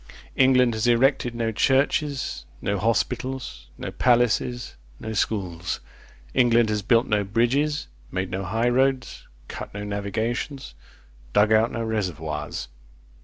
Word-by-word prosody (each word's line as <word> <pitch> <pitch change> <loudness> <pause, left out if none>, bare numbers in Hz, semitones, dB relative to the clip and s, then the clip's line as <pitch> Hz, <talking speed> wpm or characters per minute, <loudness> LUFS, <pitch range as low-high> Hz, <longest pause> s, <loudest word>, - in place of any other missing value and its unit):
England 130 -2 +4
has 110 +2 0
erected 120 0 +3
no 115 -1 -1
churches, 140 +3 +1
no 100 -1 -1
hospitals, 115 - -2
no - - -5
palaces, 120 0 +1 0.3
no 110 - -5
schools; 90 -5 -2 0.5
England 120 -2 +4
has 105 -1 0
built 115 +3 +3
no 105 -1 +1
bridges, 125 +9 +1 0.3
made 95 0 -2
no 95 +1 -2
high 110 +5 0
roads, 130 +1 0 0.2
cut - - -7
no 100 - -4
navigations, 105 - -3 0.6
dug 105 +1 +4
out 110 +2 +4
no 115 - -3
reservoirs. 80 - -3
115 Hz, 120 wpm, -24 LUFS, 100-125 Hz, 0.6 s, England